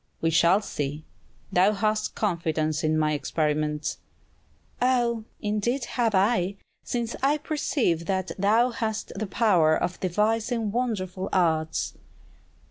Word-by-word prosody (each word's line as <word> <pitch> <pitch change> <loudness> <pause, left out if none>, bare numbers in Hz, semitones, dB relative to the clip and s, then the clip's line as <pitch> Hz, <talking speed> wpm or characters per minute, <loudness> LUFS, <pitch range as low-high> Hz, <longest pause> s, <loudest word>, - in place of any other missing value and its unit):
"We 165 - +1
shall 170 +5 +4
see. 145 -3 -4 0.5
Thou 190 +4 +4
hast 215 +1 -1
confidence 160 -6 -1
in 155 0 +2
my 155 -1 +2
experiments." 150 0 -1 0.8
"Ah, 245 -2 +2 0.3
indeed 215 +5 0
have 230 -4 0
I; 195 -1 +2 0.3
since 235 -1 -3
I 280 +3 +3
perceive 280 - -1
that 190 -1 -1
thou 220 +6 +3
hast 220 -3 -3
the 215 +1 -4
power 180 -7 +3
of 180 - -3
devising 215 +4 0
wonderful 195 -6 -2
arts!" 160 - +1
195 Hz, 120 wpm, -26 LUFS, 160-230 Hz, 0.8 s, shall